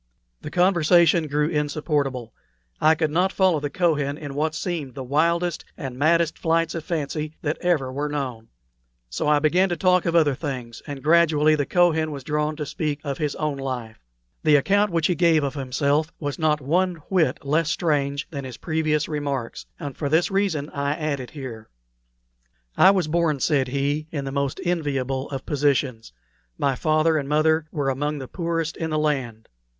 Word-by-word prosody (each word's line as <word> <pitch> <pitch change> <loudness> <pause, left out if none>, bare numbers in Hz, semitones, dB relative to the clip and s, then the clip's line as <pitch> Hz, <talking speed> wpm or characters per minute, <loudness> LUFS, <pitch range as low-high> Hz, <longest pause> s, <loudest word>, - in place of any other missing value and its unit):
The - - -6
conversation 170 -1 +4
grew 150 +1 +1
insupportable. 145 -5 -1 0.5
I 155 +1 +5
could 155 -1 0
not 180 +4 +2
follow 185 -6 +2
the 145 0 -3
Kohen 145 -3 0
in 145 -3 -7
what 155 +2 -1
seemed 155 -7 -4
the 135 - -5
wildest 170 +5 +1
and 135 -6 -6
maddest 165 +4 +2
flights 165 0 +1
of 165 - -4
fancy 155 -1 -3
that 155 +1 -1
ever 150 -8 +1
were 145 +2 -2
known; 130 -6 -4 0.6
so - - -2
I 150 0 +5
began 175 +6 +3
to 175 - -2
talk 180 +1 +3
of 170 - 0
other 155 -4 +4
things, 125 -5 -6
and 140 -2 -7
gradually 155 -1 +4
the 145 -2 0
Kohen 165 -3 +3
was 140 -3 -7
drawn 150 +2 -1
to 150 -1 -4
speak 150 -1 -3
of 140 -2 -4
his 150 -2 -1
own 150 -2 -2
life. 125 -5 -5 0.4
The 150 -1 +4
account 200 +8 +3
which 165 -2 +1
he 180 - +3
gave 165 -3 +3
of 140 -1 -2
himself 145 +3 0
was 145 -1 -4
not 155 -2 +2
one 180 +6 +1
whit 160 -8 +1
less 155 +3 +1
strange 140 -4 0
than 140 -3 -5
his 130 -3 -8
previous 155 0 0
remarks, 140 -5 -4
and 140 -2 -6
for 145 - -3
this 160 +5 +2
reason 185 -7 0
I 140 0 -1
add 155 -3 -2
it 125 - -7
here. 125 -7 -8 1.1
"I 190 - +7
was 190 -5 +2
born," 155 -2 +1
said 135 -2 +1
he, 140 +3 -1
"in 140 -3 -3
the 135 - -4
most 140 -1 -2
enviable 135 -6 -1
of 135 -2 -5
positions. 140 -5 0 0.5
My 140 - +1
father 155 +3 +2
and 140 -2 -3
mother 155 +1 +2
were 140 -3 0
among 145 +3 -2
the 135 -2 -6
poorest 165 -1 -2
in 160 - -3
the 155 - -1
land. 135 -7 -2
150 Hz, 185 wpm, -23 LUFS, 140-165 Hz, 1.1 s, I